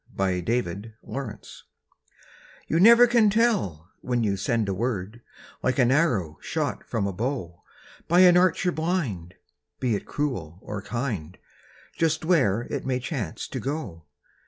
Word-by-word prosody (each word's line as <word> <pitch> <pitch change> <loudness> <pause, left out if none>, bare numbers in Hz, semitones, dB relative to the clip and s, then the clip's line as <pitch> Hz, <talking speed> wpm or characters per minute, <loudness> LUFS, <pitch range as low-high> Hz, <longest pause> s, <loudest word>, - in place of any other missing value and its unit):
YOU 95 -2 +1
NEVER 120 +6 +1
CAN 85 +3 -6
TELL 110 0 -9 1.0
You 165 - +1
never 235 +5 +8
can 235 -3 +4
tell 195 - 0
when 120 -2 -1
you 100 -2 +1
send 115 +2 0
a 100 - 0
word, 110 0 -3 0.4
Like 130 -1 0
an 125 -2 +4
arrow 110 - +1
shot - - -3
from 105 -3 -1
a 100 - -2
bow 105 - -4 0.5
By 175 +2 +5
an 180 -1 +7
archer 180 0 +3
blind, 150 - -2 0.4
be 125 -3 0
it - - -6
cruel 95 - -3
or 105 -1 -5
kind, 100 - -4 0.6
Just 160 -1 0
where 125 - +3
it - - -4
may 130 -1 -1
chance 125 - -4
to - - -4
go! 115 - -5
120 Hz, 150 wpm, -25 LUFS, 95-160 Hz, 1.0 s, never